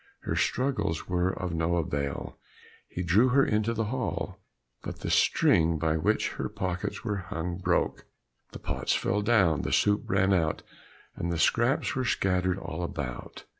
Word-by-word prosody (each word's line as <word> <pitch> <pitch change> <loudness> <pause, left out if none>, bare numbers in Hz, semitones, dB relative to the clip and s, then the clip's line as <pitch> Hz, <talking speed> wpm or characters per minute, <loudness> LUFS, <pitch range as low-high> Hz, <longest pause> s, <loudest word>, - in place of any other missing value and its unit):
Her - - -2
struggles 125 - 0
were 90 0 +1
of 90 -2 -4
no 80 +1 0
avail, 70 -4 -3 0.5
he 90 - -4
drew 100 +9 +4
her 135 +2 +4
into 110 +1 +1
the 115 -1 -1
hall; 105 -6 -3 0.4
but - - -7
the - - -2
string 80 0 +3
by 80 +1 0
which 80 - +1
her - - -4
pockets 90 -2 -3
were 105 -1 -1
hung 90 -2 -4
broke, 90 -2 0 0.4
the - - -7
pots - - -1
fell 105 +2 0
down, 100 - +3
the - - -3
soup 105 0 +3
ran 95 0 +2
out, 80 -4 0 0.5
and 85 - -3
the 85 - -1
scraps 120 - +2
were 130 - 0
scattered 95 -5 +1
all 90 -3 -5
about. 70 -8 -5
90 Hz, 165 wpm, -28 LUFS, 85-105 Hz, 0.5 s, drew